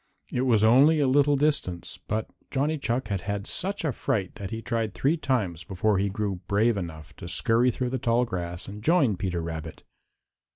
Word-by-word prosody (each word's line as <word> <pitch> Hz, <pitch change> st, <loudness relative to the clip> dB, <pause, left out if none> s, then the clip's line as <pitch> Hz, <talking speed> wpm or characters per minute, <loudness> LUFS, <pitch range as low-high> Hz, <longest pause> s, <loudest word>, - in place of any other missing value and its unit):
It 125 Hz, -, 0 dB
was 115 Hz, -5 st, +3 dB
only 140 Hz, +8 st, +6 dB
a 145 Hz, -, +3 dB
little 145 Hz, +2 st, +4 dB
distance, 140 Hz, -, -1 dB
but 110 Hz, +1 st, -1 dB, 0.2 s
Johnny 145 Hz, +3 st, 0 dB
Chuck 120 Hz, -3 st, -1 dB
had 100 Hz, -3 st, -1 dB
had 100 Hz, +1 st, -3 dB
such 195 Hz, -, -2 dB
a 150 Hz, -, +1 dB
fright 100 Hz, -6 st, -2 dB
that 100 Hz, -2 st, -6 dB
he 110 Hz, -, -4 dB
tried 115 Hz, -3 st, -2 dB
three 145 Hz, +5 st, +2 dB
times 110 Hz, -, -1 dB
before 95 Hz, +3 st, 0 dB
he 100 Hz, +1 st, +1 dB
grew 100 Hz, -2 st, -2 dB
brave 110 Hz, +3 st, +3 dB
enough 80 Hz, -4 st, -6 dB
to 85 Hz, -, -8 dB
scurry 115 Hz, +6 st, +2 dB
through 125 Hz, +1 st, -2 dB
the 130 Hz, -, -1 dB
tall 120 Hz, 0 st, +2 dB
grass 90 Hz, -4 st, -5 dB
and 105 Hz, +1 st, -8 dB
join 150 Hz, -, +3 dB
Peter 90 Hz, -2 st, -2 dB
Rabbit. 80 Hz, -1 st, -6 dB
110 Hz, 195 wpm, -26 LUFS, 95-130 Hz, 0.2 s, only